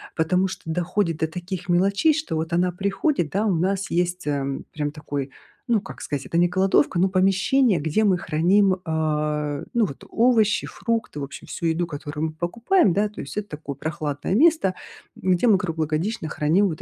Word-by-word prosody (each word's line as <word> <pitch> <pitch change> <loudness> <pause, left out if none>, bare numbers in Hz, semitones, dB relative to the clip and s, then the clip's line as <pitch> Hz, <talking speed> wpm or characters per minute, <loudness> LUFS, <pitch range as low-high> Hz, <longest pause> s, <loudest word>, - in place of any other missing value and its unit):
потому 180 +4 +2
что 185 - -7
доходит 170 +1 -1
до 160 - 0
таких 180 +2 -6
мелочей, 200 - +3
что 310 - -3
вот 160 +1 -3
она 180 +1 +2
приходит, 195 - -1
да, 205 +3 0
у 205 - +2
нас 190 +3 -1
есть, 180 +1 0
ам, 140 -2 -2
прям 145 -1 -3
такой, 145 -2 -5 0.4
ну, 225 -4 +3
как 195 - -10
сказать, 140 -2 -4
это 170 - -2
не 175 - +5
кладовка, 190 +4 +2
ну, 185 +2 +3
помещение, 195 - +3
где 160 +8 +1
мы 185 -3 +3
храним, 185 +5 +2
а, 150 -2 -1
ну, 235 -2 +3
вот 140 - -8
овощи, 225 -3 +3
фрукты, 230 -8 -3
в 140 - -4
общем, 140 - -10
всю - - -5
еду, 165 +1 +1
которую 150 0 -4
мы 155 - -5
покупаем, 205 - +1
да. 210 +1 +1
То 210 - -12
есть 135 - -7
это 210 -1 -4
такое 150 -2 -6
прохладное 150 +1 -3
место, 305 - +4 0.5
м, 185 - +1
где 180 +8 +1
мы 210 -4 +6
круглогодично 160 +2 -2
храним 165 +9 +2
вот 160 -3 -5
175 Hz, 190 wpm, -23 LUFS, 155-200 Hz, 0.5 s, мы